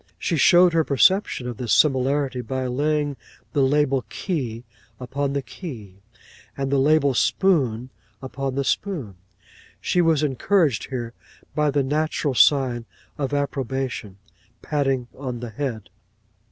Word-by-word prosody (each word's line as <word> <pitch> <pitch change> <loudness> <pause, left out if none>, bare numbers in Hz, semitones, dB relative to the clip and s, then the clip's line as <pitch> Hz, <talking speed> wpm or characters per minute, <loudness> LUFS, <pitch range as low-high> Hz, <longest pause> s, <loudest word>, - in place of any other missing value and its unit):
She 170 - -1
showed 175 +3 +6
her 165 -1 +3
perception 150 -1 +2
of 120 -3 -5
this 120 -3 -3
similarity 135 -2 +2
by 130 +2 -3
laying 145 +2 0 0.4
the 145 - +2
label 135 -1 +2
key 125 - -3 0.4
upon 140 +2 -2
the 140 -1 -2
key, 110 - -9 0.6
and 135 0 -2
the 140 - +3
label 140 0 +3
spoon 130 - +1 0.3
upon 135 0 -4
the 140 - 0
spoon. 135 - -2 0.6
She 180 - +1
was 160 -3 +2
encouraged 145 - +1
here 120 -3 -4 0.4
by 150 -1 +1
the 140 0 +1
natural 150 0 -1
sign 125 -3 +3 0.3
of 140 -1 -2
approbation, 135 -7 -3 0.5
patting 135 -4 0
on 130 -3 -5
the 120 -1 -6
head. 115 -3 -5
135 Hz, 130 wpm, -23 LUFS, 125-150 Hz, 0.6 s, showed